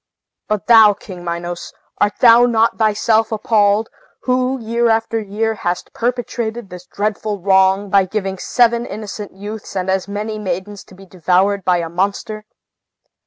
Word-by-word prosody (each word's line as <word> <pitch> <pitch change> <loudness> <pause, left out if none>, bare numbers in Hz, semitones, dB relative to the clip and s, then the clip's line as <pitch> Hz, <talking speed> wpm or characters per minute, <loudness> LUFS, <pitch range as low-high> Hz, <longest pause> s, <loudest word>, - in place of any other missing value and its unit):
But 210 -2 -2
thou, 220 -3 +7
King 185 -3 -11
Minos, 175 0 -5 0.3
art 205 - +2
thou 240 0 +7
not 230 -1 +1
thyself 220 +1 +2
appalled, 215 -1 +2 0.4
who, 255 +1 0
year 235 +1 0
after 225 0 0
year, 220 +2 -2
hast 175 -4 -4
perpetrated 235 -3 -3
this 180 0 -10
dreadful 210 0 -3
wrong, 190 +1 +3
by 195 -1 +4
giving 195 -1 -4
seven 235 0 +1
innocent 210 -1 -7
youths 205 +2 -8
and 190 0 -1
as 190 0 -1
many 210 +2 -4
maidens 190 +1 -5
to 185 - -17
be 195 +1 -14
devoured 190 +2 0
by 180 -1 +2
a 170 -1 -3
monster? 200 +5 -3
210 Hz, 150 wpm, -18 LUFS, 190-225 Hz, 0.4 s, thou